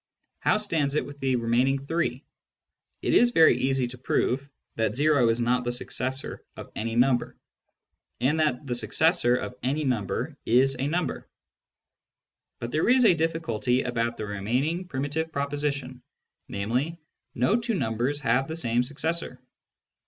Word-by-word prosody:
How - - +3
stands 160 -9 -1
it - - +1
with 145 0 -10
the 135 -2 +1
remaining 120 +3 +2
three? 155 -4 -1 0.8
It - - +1
is 240 - +6
very 165 - +6
easy 135 0 +1
to 125 0 -11
prove 130 +2 0 0.3
that 110 +2 -1
o 145 -5 +4
is 115 +1 +1
not 125 +1 +1
the 120 - -1
successor 130 +2 -4
of - - -9
any 115 +1 -3
number, 125 0 +2 0.8
and 140 +6 +1
that 150 -3 +1
the 125 - -2
successor 160 +1 +2
of 125 - -3
any 140 +5 0
number 125 - -1
is 130 +3 +3
a 135 - 0
number. 170 +3 -2 1.3
But 120 0 -5
there 155 - +1
is 250 0 +5
a 200 - +7
difficulty 160 -7 0
about 115 -1 -1
the 110 - -4
remaining 125 - -1
primitive 145 +2 -2
proposition, 140 -3 -3 0.5
namely, 125 +11 -2 0.2
" - - -51
no 160 - +2
two 230 -1 -1
numbers 125 - -1
have 130 +1 +2
the 160 - -4
same 120 -6 +1
successor." 145 +1 -3
135 Hz, 150 wpm, -26 LUFS, 120-155 Hz, 1.3 s, a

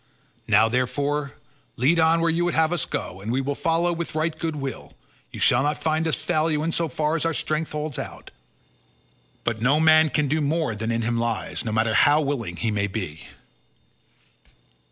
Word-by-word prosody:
Now, 110 +1 +5
therefore, 140 +4 -1 0.4
lead 150 +8 +2
on 165 +1 +4
where 165 - +2
you 170 +2 0
would 175 - 0
have 160 +1 +3
us 175 - +1
go, 95 - -5
and 105 +3 -4
we 130 - 0
will 135 +1 -2
follow 165 +3 0
with 170 -2 -5
right 155 +1 0
goodwill; 150 -5 -5 0.4
you - - -9
shall 120 - +4
not 145 +2 -1
find 160 0 +1
us 160 - +1
fail 160 0 0
you 150 -1 0
in 165 - -1
so 165 0 +1
far 155 0 -1
as 165 - 0
our 165 -1 0
strength 155 +1 -2
holds 150 -2 -4
out, - - -8 1.1
but 110 -2 -2
no 135 +5 +3
man 155 0 +5
can 150 -1 0
do 155 +3 0
more 150 -3 0
than 110 +2 -3
in 115 0 -1
him 120 +1 0
lies, 115 -7 -2
no 115 - -3
matter 110 0 +1
how 145 +6 +5
willing 135 - -2
he 110 +7 -1
may 100 -1 0
be." 95 -7 -6
150 Hz, 195 wpm, -24 LUFS, 115-160 Hz, 1.1 s, Now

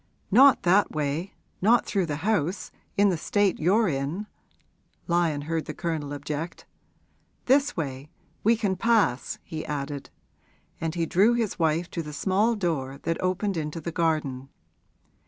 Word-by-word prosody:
'Not 265 +6 +7
that 190 +3 +4
way 155 +5 -2 0.3
not 230 +5 +4
through 190 -4 0
the 150 - -2
house, 195 -4 0 0.3
in 205 0 +5
the 180 - 0
state 205 +4 +1
you're 200 +7 +3
in,' 145 +6 -2 0.8
Lyon 170 -4 +1
heard 160 +1 -2
the - - -6
Colonel 160 -4 -3
object. 150 +3 -5 0.8
'This 275 -1 +3
way 140 -2 -4 0.3
we 230 +3 +5
can 200 -4 0
pass,' 210 - +1
he 155 -1 -6
added; 140 -1 -4 0.7
and 165 0 -3
he 170 -1 0
drew 205 +8 +4
his 225 -6 -2
wife 165 +1 +1
to 170 - -3
the 150 -2 -8
small 205 +8 +1
door 150 -9 -2
that 165 - -1
opened 185 +1 -1
into 150 +1 -3
the 170 +2 -5
garden. 155 -6 -1
170 Hz, 150 wpm, -26 LUFS, 150-200 Hz, 0.8 s, Not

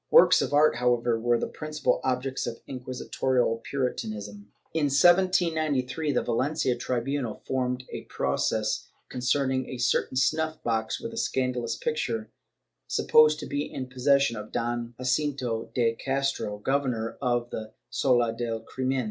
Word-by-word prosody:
^ - - -56
Works - - +7
of - - -1
art, 145 -3 +4
however, 120 -1 +2
were 120 +1 +2
the - - -1
principal 155 0 -1
objects 130 +1 -1
of 115 - -6
inquisi 130 -1 -6
torial 125 -3 +1
Puritanism. 105 -6 -4 0.2
In 160 -2 +1
1793, 155 -3 +3
the 125 - +1
Valencia 130 +2 0
tribunal 125 0 -2
formed 125 -1 -1
a - - -6
pro - - 0
cess - - 0 0.2
concerning 130 +1 0
a 130 - -5
certain 130 +1 +1
snuff 155 +4 +1
box 110 -1 -1
with 230 0 -6
a - - -8
scandalous 125 - -1
picture, 115 -8 -2 0.6
supposed 155 0 +4
to - - -5
be 145 +1 -3
in 130 -1 -5
possession 135 0 +3
of 105 0 -7
Don 120 0 -2
Jacinto 130 -3 -1
de 115 -2 +3
Castro, 135 -4 -1
governor 125 -1 -1
of 120 -2 0
the 110 0 -6 0.2
sala 120 -3 +2
del 115 -1 -3
crimen. 130 +2 -2
130 Hz, 150 wpm, -27 LUFS, 120-140 Hz, 0.6 s, Works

